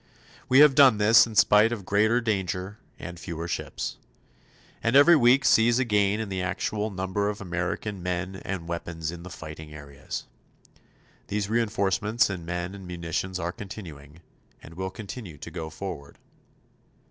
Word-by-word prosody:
We 130 +2 +7
have 150 -2 +8
done 135 -5 +6
this 110 +3 +6
in 110 - -9
spite 105 +2 +5
of 105 -5 -5
greater 110 +5 +2
danger 100 -2 -2 0.2
and 85 +1 -8
fewer 85 -2 -5
ships. 85 - -4 0.8
And 115 +3 +1
every 145 +5 +8
week 135 0 +4
sees 115 +1 +5
a 130 - +1
gain 105 -1 +2
in 110 - -3
the 95 -1 -3
actual 105 +3 -2
number 95 +1 -2
of 105 - -5
American 90 +2 -4
men 90 +1 -3
and 95 -3 -5
weapons 85 -1 -4
in 85 -1 -9
the 90 - -9
fighting 80 -2 -9
areas. 70 -2 -8 1.0
These 100 0 -2
reinforcements 110 0 +1
in 90 -3 -6
men 90 +2 -4
and 95 -2 -10
munitions 90 +1 -3
are 85 -1 -3
continuing, 85 -7 -10 0.4
and 80 - -13
will 95 +2 -4
continue 105 -5 -9
to - - -9
go 80 -3 -5
forward. 80 -4 -8
95 Hz, 160 wpm, -26 LUFS, 85-110 Hz, 1.0 s, have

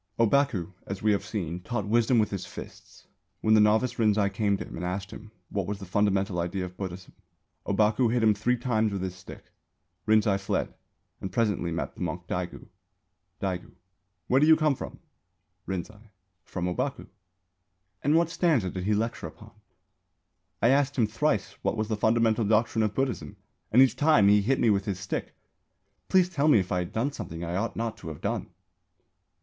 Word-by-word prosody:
Ōbaku, 115 - +2
as 95 +1 -5
we 110 - +4
have 100 - +1
seen, 90 -5 -4
taught 105 +2 -3
wisdom 115 +3 +3
with 110 -2 +2
his 100 -3 -3
fists. - - -11 0.4
When 110 - +3
the 110 - +6
novice 110 +4 +2
Rinzai 105 -2 +3
came 100 -1 +1
to - - -6
him - - -9
and 85 - -5
asked 95 +2 -3
him 110 0 -10 0.2
what 100 -3 -2
was 105 0 -3
the 100 - -9
fundamental 95 -1 +1
idea 90 +2 -2
of 90 0 -10
Buddhism, 95 -1 -7 0.5
Ōbaku 105 +4 +2
hit 120 -1 +1
him 110 -1 +5
three 120 +5 0
times 110 -3 0
with 95 -2 -3
his 95 -1 -3
stick. 90 -1 -13 0.6
Rinzai 110 -2 +3
fled 95 - -2 0.5
and 95 - -5
presently 105 -7 0
met 85 - -3
the - - -13
monk - - -3
Daigu. - - -4 0.8
Daigu: 95 -2 -3 0.5
Where 130 +2 +3
do 150 - +5
you 160 - +8
come 155 -2 +2
from? - - -7 0.7
Rinzai: 105 +4 -6 0.4
From 90 -1 -4
Ōbaku. 90 -1 -2
Daigu: - - -17 0.9
And 145 +3 +2
what 165 0 +3
stanza 145 - +1
did 95 -1 -5
he 105 +1 +2
lecture 115 +3 -2
upon? - - -13
Rinzai: - - -28
I 115 - +6
asked 140 +1 +2
him 120 - +3
thrice 105 -1 0
what - - -1
was 110 0 -2
the 110 - +1
fundamental 110 +1 +2
doctrine 110 +2 +2
of 105 -1 0
Buddhism 135 -2 -2 0.3
and 125 +4 +7
each 135 - +1
time 145 -10 +5
he 105 0 +5
hit 130 +6 +1
me 115 - +4
with 100 -1 +1
his 95 -3 -3
stick. 95 - -4 0.7
Please 185 -2 +4
tell 155 -5 0
me 150 - +6
if 95 -3 -1
I 90 0 0
did 120 +10 -2
something 80 - -6
I 85 +1 -3
ought 105 +5 -2
not 115 -1 -3
to - - -10
have 75 -3 -7
done? - - -2
105 Hz, 190 wpm, -27 LUFS, 95-120 Hz, 0.9 s, you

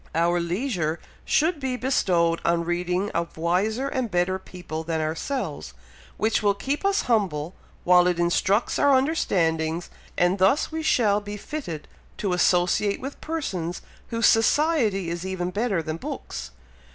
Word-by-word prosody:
Our 170 +1 +2
leisure 170 - -1 0.3
should 320 +1 +2
be 265 -2 -2
bestowed 175 -10 +1
on 170 0 +1
reading 180 +3 -1
of 170 -1 -3
wiser 200 +10 0
and 260 -4 -2
better 180 0 0
people 175 -4 -7
than 160 0 -2
ourselves, 155 - -3 0.4
which 220 +1 +1
will 205 -1 +2
keep 275 - -3
us 395 0 +2
humble 185 - 0 0.3
while 180 0 +5
it 180 -1 +1
instructs 180 +5 +1
our 280 -2 +5
understandings, 170 - 0 0.3
and 175 +2 +2
thus 195 +14 +3
we 320 0 -3
shall 210 -9 +2
be 205 0 -6
fitted 200 - -6 0.3
to 195 -3 -1
associate 180 +3 +2
with 270 +2 -7
persons 190 - -3 0.2
whose 230 0 0
society 225 - +3
is 170 0 -4
even 185 -1 -3
better 200 -4 0
than 155 0 -4
books. 60 - -6
185 Hz, 145 wpm, -25 LUFS, 170-235 Hz, 0.4 s, while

